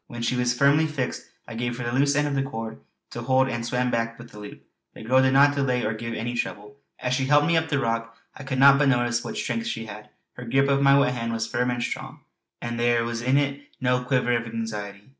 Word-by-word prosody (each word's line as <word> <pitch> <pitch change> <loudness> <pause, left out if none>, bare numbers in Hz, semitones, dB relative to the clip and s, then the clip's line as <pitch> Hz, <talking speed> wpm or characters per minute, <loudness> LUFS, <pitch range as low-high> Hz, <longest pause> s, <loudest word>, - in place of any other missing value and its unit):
When 120 -1 -7
she 125 - 0
was 125 0 0
firmly 145 +4 +4
fixed 140 -5 -4 0.2
I 115 - -8
gave 120 +1 -3
her 125 - -5
the 120 - -2
loose 140 +2 +2
end 145 0 +2
of 145 - -2
the 135 - +1
cord 115 - -6 0.3
to 120 - -6
hold 130 +2 +2
and 120 -3 -3
swam 125 +1 -1
back 115 0 -1
with 120 0 -12
the 105 - -11
loop. 105 0 -10 0.3
The - - -10
girl 130 +4 +4
did 130 0 +3
not 140 +1 +6
delay 130 -3 0
or 110 - 0
give 115 +1 -5
any 120 +2 -3
trouble. 105 0 -5 0.2
As 125 0 -2
she 130 +1 0
helped 145 +1 +4
me 170 - +2
up 160 0 +1
the 145 - +1
rock 115 -2 -2 0.2
I - - -10
could 135 -1 -4
not 140 +1 +7
but 145 -2 +3
notice 120 -2 +1
what 215 - -6
strength 230 +2 -2
she 115 - -4
had; 105 0 -10 0.2
her 125 - -9
grip 135 +4 +2
of 140 0 +2
my 140 0 +6
wet 140 -2 +3
hand 115 -1 -3
was 110 -1 -1
firm 125 +2 -1
and 120 -1 -1
strong, - - -6 0.4
and 120 0 -4
there 120 -1 +2
was 115 0 -3
in 130 +3 +2
it 140 0 0 0.2
no 125 -1 +1
quiver 125 -1 +1
of 120 0 -2
anxiety. 105 -2 -6
125 Hz, 260 wpm, -25 LUFS, 115-140 Hz, 0.4 s, not